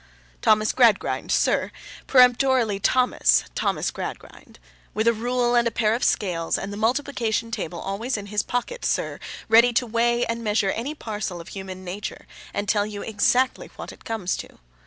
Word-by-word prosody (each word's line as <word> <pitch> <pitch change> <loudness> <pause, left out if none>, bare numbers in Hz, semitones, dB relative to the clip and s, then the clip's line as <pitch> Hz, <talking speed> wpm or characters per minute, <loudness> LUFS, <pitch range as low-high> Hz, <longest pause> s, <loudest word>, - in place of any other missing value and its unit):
Thomas 215 0 +3
Gradgrind, 235 -5 +2
sir—peremptorily 250 -4 +2
Thomas—Thomas 250 +5 +1
Gradgrind. - - -8 0.4
With 220 +2 0
a 235 - +5
rule 240 +2 0
and 240 -1 +3
a - - +2
pair 220 -2 +1
of 240 - -2
scales, 170 -5 0
and 200 +1 -5
the - - -6
multiplication 230 -1 -1
table 170 -6 -4
always 220 +6 -3
in 205 - -6
his 205 0 -1
pocket, 365 - -4
sir, - - -1 0.3
ready 230 +2 +6
to 245 - +2
weigh 235 +1 +1
and 230 0 -3
measure 210 -2 +1
any 270 +7 -4
parcel 205 - -5
of 170 - -10
human 190 -1 -8
nature, 195 +3 -6 0.3
and 205 0 -3
tell 205 0 +1
you 205 -1 -6
exactly 245 +4 +1
what - - -8
it - - -16
comes 215 -5 -2
to. - - -10
225 Hz, 160 wpm, -24 LUFS, 205-245 Hz, 0.4 s, ready